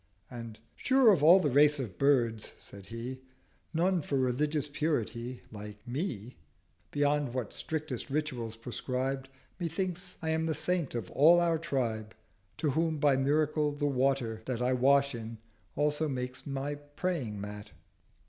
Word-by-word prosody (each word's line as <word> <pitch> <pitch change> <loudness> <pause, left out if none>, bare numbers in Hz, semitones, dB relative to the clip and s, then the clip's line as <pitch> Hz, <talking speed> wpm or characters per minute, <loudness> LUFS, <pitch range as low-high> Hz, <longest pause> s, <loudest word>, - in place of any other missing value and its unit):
And 115 -3 -7 0.2
'Sure 260 -3 +5
of 175 - +1
all 170 +5 +8
the 150 -6 +1
Race 150 +2 +5
of 110 -10 -6
Birds,' 120 -6 +2
said 100 -1 -12
He, 120 +3 -6 0.5
'None 175 +2 +2
for 140 -1 -1
Religious 145 +4 0
Purity 130 -5 -2
like 105 0 -9
Me, 125 - -4 0.5
Beyond 145 -3 +1
what 125 -5 -3
strictest 155 -6 -3
Rituals 130 -6 -2
prescribe— 130 +3 -3 0.3
Methinks 180 +2 -3
I 160 - -3
am 160 0 0
the 160 - 0
Saint 175 -7 0
of 115 -6 -4
all 165 +5 +6
our 170 -2 +2
Tribe, 115 -9 -2 0.4
To 150 - 0
whom, 160 +2 +1
by 145 -2 +4
Miracle, 150 +2 +1
the 145 0 -2
Water, 130 -5 +1
that 125 -3 -2
I 125 +1 +2
wash 140 +2 +4
in, 115 -1 -6 0.4
also 150 +1 +1
makes 125 0 -5
my 140 +1 -2 0.2
Praying 140 - -2
Mat.' 105 +1 -7
140 Hz, 150 wpm, -31 LUFS, 120-155 Hz, 0.5 s, all